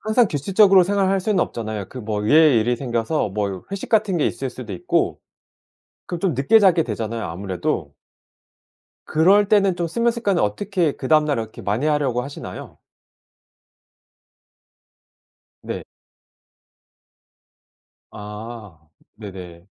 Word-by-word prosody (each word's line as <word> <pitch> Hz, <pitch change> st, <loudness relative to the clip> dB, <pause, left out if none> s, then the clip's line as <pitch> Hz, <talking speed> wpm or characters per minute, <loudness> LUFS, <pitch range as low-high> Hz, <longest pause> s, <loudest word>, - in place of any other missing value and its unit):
항상 220 Hz, +2 st, +3 dB
규칙적으로 190 Hz, +6 st, +4 dB
생활할 195 Hz, 0 st, +1 dB
수는 195 Hz, -1 st, +1 dB
없잖아요. 110 Hz, -4 st, -3 dB
그 130 Hz, -, -9 dB
뭐 105 Hz, -2 st, -3 dB
의외의 145 Hz, 0 st, +5 dB
일이 120 Hz, +2 st, 0 dB
생겨서 120 Hz, -1 st, -1 dB
뭐 100 Hz, -2 st, -3 dB
회식 200 Hz, -1 st, -5 dB
같은 210 Hz, -5 st, +2 dB
게 -, -, +2 dB
있을 135 Hz, -1 st, -3 dB
수도 120 Hz, -5 st, -8 dB
있고. 90 Hz, -, -1 dB, 0.9 s
그럼 175 Hz, -2 st, -5 dB
좀 185 Hz, -4 st, 0 dB
늦게 140 Hz, -, +4 dB
자게 180 Hz, -5 st, +4 dB
되잖아요 110 Hz, 0 st, -4 dB
아무래도. 90 Hz, +2 st, -3 dB, 1.1 s
그럴 195 Hz, +6 st, +4 dB
때는 200 Hz, -4 st, +3 dB
좀 170 Hz, -1 st, -1 dB
수면 235 Hz, +7 st, 0 dB
습관을 205 Hz, -6 st, 0 dB
어떻게 170 Hz, -, 0 dB
그 130 Hz, -, -7 dB
다음날 150 Hz, -3 st, +3 dB
이렇게 110 Hz, -1 st, -6 dB
많이 110 Hz, +9 st, -1 dB
하려고 140 Hz, -5 st, 0 dB
하시나요? 140 Hz, +2 st, -9 dB, 2.8 s
네. -, -, -5 dB, 2.3 s
아, 105 Hz, -3 st, -9 dB, 0.4 s
네네. 90 Hz, -4 st, -10 dB
140 Hz, 260 characters per minute, -21 LUFS, -, 2.8 s, 의외의